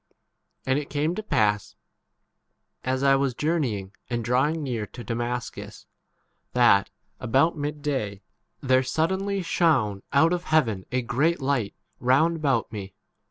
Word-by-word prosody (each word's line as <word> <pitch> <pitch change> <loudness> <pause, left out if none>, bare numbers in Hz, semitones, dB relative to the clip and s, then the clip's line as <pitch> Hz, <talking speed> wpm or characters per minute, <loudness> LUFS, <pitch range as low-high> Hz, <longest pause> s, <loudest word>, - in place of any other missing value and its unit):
And 130 +2 +2
it 145 - -7
came 150 +3 0
to 215 - -4
pass, 105 - 0 1.1
1 130 - +1
as 130 - -3
I 135 0 +5
was 135 -2 0
journey 150 -8 0
ing 95 0 -9 0.2
and 120 -2 -2
drawing 140 +7 +1
near 115 -6 -3
to 120 - -10
Damascus, 120 +1 -4 0.7
that, 120 -5 +4 0.3
about 135 +8 +2
mid 145 0 -4
day, 105 -9 -2 0.4
there 130 -1 +3
sud 155 +7 0
denly 195 0 -2
shone 130 - +2
out 160 +5 +4
of 175 0 -3
heaven 115 -12 +1
a 130 0 0
great 140 +8 +1
7 135 - -7
light 125 -8 0 0.2
round 155 +7 +3
about 135 -9 0
me. 100 -3 -7
130 Hz, 155 wpm, -25 LUFS, 115-155 Hz, 1.1 s, I